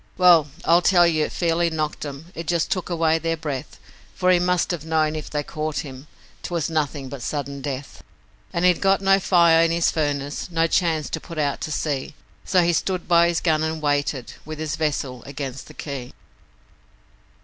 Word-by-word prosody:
Well, 175 -4 +6 0.2
I 170 +1 +6
tell 175 -1 +5
you 155 -2 +2
it - - -6
fairly 170 0 +1
knocked 155 -2 -3
'em 145 +5 -9
it 165 -2 -7
just 170 -2 0
took 185 -2 -1
away 165 -2 +2
their 165 0 -1
breath, 145 -5 -5 0.4
For 185 - +3
he 180 - +5
must 180 0 +1
ha' 170 -4 -4
known 155 -1 +1
if 155 - -6
they 150 -1 -2
caught 155 0 -3
him, 135 +1 -10 0.3
'twas 170 -2 -2
nothin' 145 -3 -1
but 135 -1 -8
sudden 140 +1 -4
death. 135 -1 -6 0.5
An' 170 - -1
he'd 180 -2 +4
got 195 0 +3
no 195 0 +4
fire 170 -3 +5
in 165 - +3
his 170 0 +2
furnace, 145 -1 -2
no 165 -1 +1
chance 165 -2 +1
to 160 - -3
put 165 -2 -10
out 145 -2 -1
to 155 - -4
sea, 145 -2 -2 0.3
So 185 -2 +3
he 170 0 +2
stood 185 +1 -1
by 170 -1 +5
his 170 -1 0
gun 155 -3 +2
and 160 0 -2
waited 145 -3 -1
with 155 0 -7
his 155 -1 -3
vessel 140 -5 -2
against 135 -2 -6
the 150 - -13
quay. 135 -4 -6
160 Hz, 195 wpm, -23 LUFS, 145-170 Hz, 0.5 s, Well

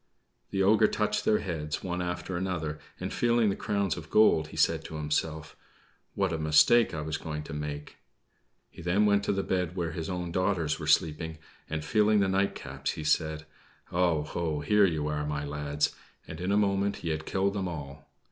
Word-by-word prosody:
The 95 - 0
ogre 110 +2 +5
touched 105 0 -1
their 105 - +4
heads, 75 -6 -4
one 90 -1 -2
after 90 +1 -3
another, 85 -4 -2 0.2
and - - -4
feeling 120 -3 +3
the - - -2
crowns 100 -3 -1
of 80 -3 -9
gold, 105 -8 +4
he - - -11
said - - +2
to 80 - -7
himself: 75 0 -2 0.6
"What 95 -4 0
a 80 - -2
mistake 75 +10 +5
I 80 - -4
was 80 +1 -3
going 75 -1 -5
to 80 - -8
make!" 75 0 -5 0.7
He - - -11
then 90 +5 +2
went 100 -1 +3
to 95 -1 0
bed 90 -2 -1
where 85 -3 -2
his 80 +1 -5
own 90 -2 -3
daughters 85 -4 0
were 75 - -5
sleeping, 80 +1 +1 0.3
and, 75 -1 -3
feeling 105 +3 +3
the 100 - +3
nightcaps, 95 +1 -1
he 80 - -6
said: 80 +1 0 0.5
"Oh, 85 -4 +2
ho, 80 -1 -2
here 105 +6 +4
you 80 -4 -1
are, 75 0 -1
my 75 -1 -3
lads!" 75 0 -1 0.3
and 80 +2 -7
in 90 +2 -1
a 100 - +3
moment 100 -1 +1
he - - 0
had 80 0 -3
killed 100 +1 +1
them 95 -2 -2
all. 75 -4 -8
85 Hz, 195 wpm, -29 LUFS, 75-95 Hz, 0.7 s, ogre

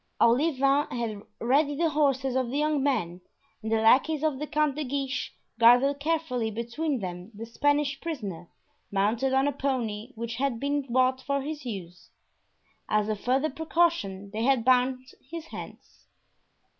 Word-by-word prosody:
Olivain 275 +3 +3
had 225 -4 -4 0.2
ready 285 +5 +2
the 325 +1 +1
horses 270 -3 +1
of 260 -2 0
the 270 - -2
young 300 -1 +1
men, 210 -11 -1 0.4
and 220 0 -4
the - - +4
lackeys 275 +7 +4
of 300 -4 0
the 300 - -4
Count 300 -1 +1
de 305 - -2
Guiche 270 -1 -3 0.3
guarded 250 +5 +5
carefully 285 -7 -1
between 235 +5 -3
them 180 +1 -6
the 225 +2 -6
Spanish 290 +4 0
prisoner, 200 - -5 0.4
mounted 215 +7 +1
on 265 +1 +3
a - - +2
pony 250 -5 -2
which 230 0 -5
had 265 -3 -1
been 280 -1 -2
bought 260 +1 +2
for 280 0 -1
his 300 -2 -6
use. 180 -5 -8 0.8
As 215 0 +1
a 215 - 0
further 265 +8 0
precaution 295 - 0
they 220 +1 -3
had 250 -1 +2
bound 255 0 +3 0.2
his 330 0 -6
hands. - - -11
260 Hz, 155 wpm, -27 LUFS, 225-290 Hz, 0.8 s, guarded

